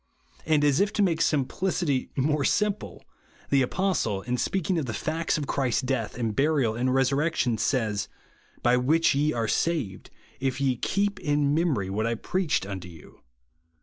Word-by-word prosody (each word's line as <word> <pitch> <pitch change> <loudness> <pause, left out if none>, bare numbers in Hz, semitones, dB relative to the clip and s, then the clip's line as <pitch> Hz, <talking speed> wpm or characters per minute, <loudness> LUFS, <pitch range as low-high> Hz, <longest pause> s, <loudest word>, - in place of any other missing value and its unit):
And 155 -2 +3
as 145 -2 +3
if 200 +1 +2
to 205 - +2
make 165 -4 +1
simplicity 150 0 0
more 145 +2 +1
simple, 210 +5 -1 0.5
the 140 -1 +4
Apostle, 130 - 0
in 125 - -1
speaking 180 +5 0
of 140 - -3
the 110 - -3
facts 160 +5 -1
of 150 - -3
Christ's 135 -2 0
death, 125 -4 -2
and 115 -4 -2
burial, 140 -5 +2
and 120 +3 0
resurrec 135 +5 +1
tion, 115 -3 0
says, 110 -6 0 0.3
" - - -32
By 120 +1 +4
which 155 +7 +3
ye 145 +2 +1
are 115 -4 -1
saved, 135 - -1 0.3
if 135 0 -1
ye 130 -3 0
hee] 200 +1 +1
) - - -13
in 145 -3 +1
memory 150 - 0
what 110 +3 -1
I 115 - 0
preached 175 - -1
unto 95 -2 -6
you," 80 -4 -13
(1 - - -19
Cor. - - -26
140 Hz, 185 wpm, -26 LUFS, 120-160 Hz, 0.5 s, the